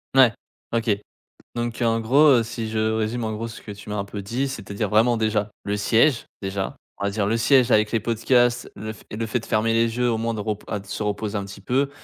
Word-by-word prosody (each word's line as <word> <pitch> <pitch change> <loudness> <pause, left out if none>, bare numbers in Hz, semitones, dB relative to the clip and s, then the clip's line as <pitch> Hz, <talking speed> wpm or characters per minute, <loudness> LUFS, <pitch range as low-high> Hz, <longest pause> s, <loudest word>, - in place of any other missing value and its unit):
Ouais. 130 -3 +7 0.4
OK. 115 -1 +1 0.6
Donc 120 -1 -3
en 115 -1 +2
gros, 140 +7 +5
heu, - - +1
si 115 -1 -5
je 110 0 -2
résume 110 +2 0
en 110 - -2
gros 110 +2 -4
ce 115 - -9
que - - -9
tu 100 0 -10
m'as 105 - -3
un 100 - -1
peu 100 0 -6
dit, 125 +8 -1
c'est-à-dire 105 -5 -4
vraiment, 115 +3 +4
déjà, 110 -2 0
le 100 +1 -1
siège, 115 +5 +3 0.2
déjà, 95 0 -3 0.2
on - - -3
va 100 - +1
dire: 100 0 -1
«Le 115 - +2
siège 125 +2 +4
avec 105 -2 +3
les 115 - +2
podcasts, 120 +2 +2
le 110 0 -6
fait 110 - -17
et - - -6
le 115 - -2
fait 110 +3 0
de - - -12
fermer 110 +1 +1
les 115 0 +2
yeux, 125 -1 +2
au 115 - 0
moins 115 +1 -1
de 110 - -4
repo 105 0 -4
à 105 - -2
de 100 - -16
se 105 - -4
reposer 105 +1 -2
un 100 - -4
petit 100 +1 -10
peu» 135 +7 0
110 Hz, 260 wpm, -23 LUFS, 105-120 Hz, 0.6 s, Ouais